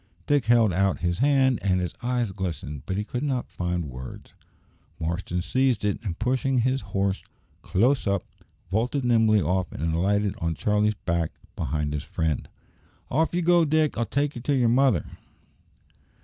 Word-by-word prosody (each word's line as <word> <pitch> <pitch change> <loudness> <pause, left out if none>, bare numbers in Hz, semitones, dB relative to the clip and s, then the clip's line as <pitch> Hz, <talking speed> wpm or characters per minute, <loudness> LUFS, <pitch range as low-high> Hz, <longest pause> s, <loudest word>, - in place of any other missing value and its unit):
Dick 145 -3 +2
held 115 -4 +4
out 95 +1 +1
his 85 +1 0
hand, 135 -2 +3
and 95 -2 +2
his 90 -2 -3
eyes 120 -3 0
glistened, 80 -7 -4
but 95 - -2
he 105 - 0
could 120 +3 -4
not 135 -4 -2
find 90 -1 -2
words. 65 -2 -9 0.7
Marston 85 +2 -2
seized 125 +2 +1
it, 100 - 0
and 90 -6 -4
pushing 130 +3 0
his 130 +2 +1
horse 100 0 -1 0.4
close 125 +6 +2
up, 100 -2 +1 0.5
vaulted 125 +6 0
nimbly 110 -4 +4
off 90 +1 0
and 80 +4 -2
alighted 100 +4 +1
on 85 -1 -1
Charlie's 105 +3 +1
back 85 -4 -1 0.2
behind 75 +1 -2
his 75 0 -3
friend. 80 -4 -2 0.6
"Off 160 +5 +1
ye 175 - +1
go, 175 0 +5
Dick! 155 0 +2
I'll 115 -1 -1
take 140 +5 0
ye 120 - -6
to 140 +3 +1
yer 125 -3 +3
mother." 120 - +3
105 Hz, 165 wpm, -26 LUFS, 90-130 Hz, 0.7 s, go